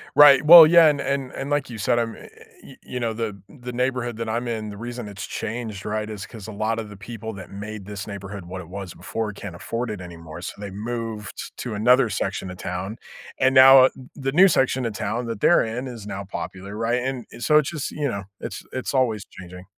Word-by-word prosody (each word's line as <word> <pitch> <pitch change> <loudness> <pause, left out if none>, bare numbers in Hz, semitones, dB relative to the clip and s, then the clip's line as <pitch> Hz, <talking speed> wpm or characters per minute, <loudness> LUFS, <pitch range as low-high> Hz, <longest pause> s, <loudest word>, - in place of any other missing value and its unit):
Right. 145 -1 +8
Well 165 0 +12
yeah. 170 0 +7
And 145 -2 +2
and 140 -2 -2
and 135 - -5
like 145 -2 0
you 115 - -7
said, 110 +3 +1
I'm 115 -1 -2
eh - - -12 0.4
y - - -13
you 125 - -5
know, 115 -2 -1
the 110 -3 -4
the 125 -3 -9
neighborhood 125 -1 -1
that 115 0 -4
I'm 120 +2 -2
in, 110 -2 -3
the 100 - -8
reason 120 0 -6
it's 100 0 -7
changed, 110 -3 -5
right, 105 0 -2
is 105 -3 -6
‘cause 110 -4 -10
a - - -6
lot 110 +2 -1
of 110 -2 -6
the 105 - -11
people 110 +2 -7
that 95 -3 -10
made 105 0 -7
this 100 -1 -6
neighborhood 100 -2 -7
what 90 +2 -7
it 85 - -12
was 95 -1 -7
before 110 -2 -4
can't 100 -3 -8
afford 115 +7 -4
it 105 -3 -5
anymore. 85 -2 -10
So 90 - -7
they 100 -1 -6
moved 110 0 -6
to 120 - -5
another 125 +3 +4
section 95 -1 -3
of 90 - -9
town. 95 +4 -5 0.4
And 130 +1 +3
now, 130 0 +10
uh, - - +4
th 130 -1 -13
the 135 -1 -2
new 185 +5 +7
section 130 -4 +1
of 115 - -2
town 110 +4 -3
that 115 -3 -4
they're 175 - +5
in 120 +4 -4
is 115 -5 -8
now 100 -1 -5
popular, 95 +1 -7
right? 115 +2 0
And 130 -2 -3
and - - -11
so 150 - +5
it's 150 -2 +2
just 155 -4 -4
you 150 -1 -2
know, 100 -4 -4 0.2
it's - - -6
it's 130 +1 -3
always 120 -6 +1
changing. 90 0 -11
115 Hz, 240 wpm, -23 LUFS, 100-125 Hz, 0.4 s, Well